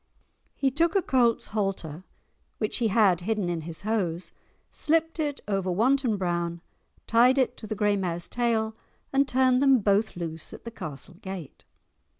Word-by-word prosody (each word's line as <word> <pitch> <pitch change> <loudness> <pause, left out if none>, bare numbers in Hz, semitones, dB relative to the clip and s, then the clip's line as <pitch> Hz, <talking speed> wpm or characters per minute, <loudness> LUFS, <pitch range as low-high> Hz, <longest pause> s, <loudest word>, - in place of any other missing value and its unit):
He 270 -1 +1
took 330 +5 +2
a 390 - +4
colt's 240 -3 +2
halter 190 -6 -2 0.5
which 215 - -2
he 235 - +1
had 195 -5 +3
hidden 205 -1 -1
in 170 -2 -2
his 160 0 -7
hose, 180 -6 -1 0.4
slipped 325 +1 0
it 295 -2 -2
over 195 -2 -1
Wanton 235 +4 +2
Brown, 170 -2 -1 0.5
tied 245 +3 +5
it 260 -2 +2
to 215 - -8
the 215 - -3
grey 205 0 +2
mare's 175 -3 -2
tail, 225 -2 0 0.4
and 275 0 +3
turned 255 0 +3
them 270 -1 +6
both 205 0 +1
loose 165 -2 -5
at - - -11
the 230 - -6
castle 155 - -8
gate. 190 -6 -8
215 Hz, 160 wpm, -27 LUFS, 175-255 Hz, 0.5 s, them